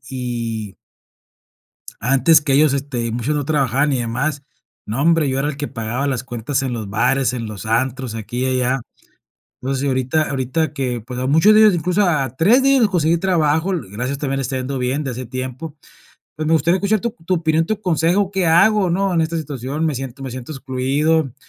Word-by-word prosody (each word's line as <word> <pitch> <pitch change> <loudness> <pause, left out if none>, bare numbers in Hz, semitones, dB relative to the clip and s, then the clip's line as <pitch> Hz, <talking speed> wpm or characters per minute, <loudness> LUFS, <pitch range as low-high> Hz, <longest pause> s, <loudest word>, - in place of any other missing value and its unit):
y 115 -4 -4
y - - -23 1.3
antes 135 +5 +4
que 145 -2 0
ellos, 145 0 +4
este, 130 -4 -2
muchos 120 +6 -1
no 145 -2 -2
trabajaban 140 -1 +1
y 130 - 0
demás, 135 +5 -2 0.4
no 110 +5 -3
hombre, 165 -4 +3
yo 130 - -1
era 140 - 0
el 150 - -5
que 145 +1 -4
pagaba 120 +5 -3
las 130 -3 -2
cuentas 130 +2 -3
en 130 -2 -2
los 110 -4 -5
bares, 125 +5 +1
en 115 -2 -4
los 110 0 -7
antros, 125 0 -1
aquí 115 +3 -5
y 130 -1 0
allá. 130 +1 0 0.8
Entonces, 135 +1 -2
ahorita 130 +3 0
ahorita 140 +3 -1
que, 125 -5 -3
pues, 125 +2 -7
a 130 - -1
muchos 160 +10 +5
de 215 - +6
ellos, 215 -3 +7
incluso 180 +4 0
a 140 -7 0
3 230 +11 +4
de 275 - +4
ellos 275 -2 +4
les 215 - +3
conseguí 170 -3 +2
trabajo, 165 -1 +1 0.2
gracias 125 +7 -3
también 135 -2 -2
les 135 - -2
está 135 - -3
yendo 130 +1 -3
bien 130 +4 -1
de 135 - -3
hace 125 +1 -6
tiempo. 130 +5 -6 0.6
Pues, 155 +1 -3
me 160 - +1
gustaría 170 +4 +3
escuchar 205 +2 +1
tu 235 - -2 0.2
tu 185 - +2
opinión, 160 -1 +1
tu 215 +1 -2
consejo, 180 +2 +1
¿qué 190 -3 0
hago, 195 +4 +4
no? 190 +2 0
En 165 - +2
esta 160 +1 -1
situación, 145 0 -4
me 155 -4 0
siento 135 +1 -7
me 135 - -5
siento 130 +4 -7
excluido. 135 +2 0
140 Hz, 210 wpm, -19 LUFS, 125-160 Hz, 1.3 s, ellos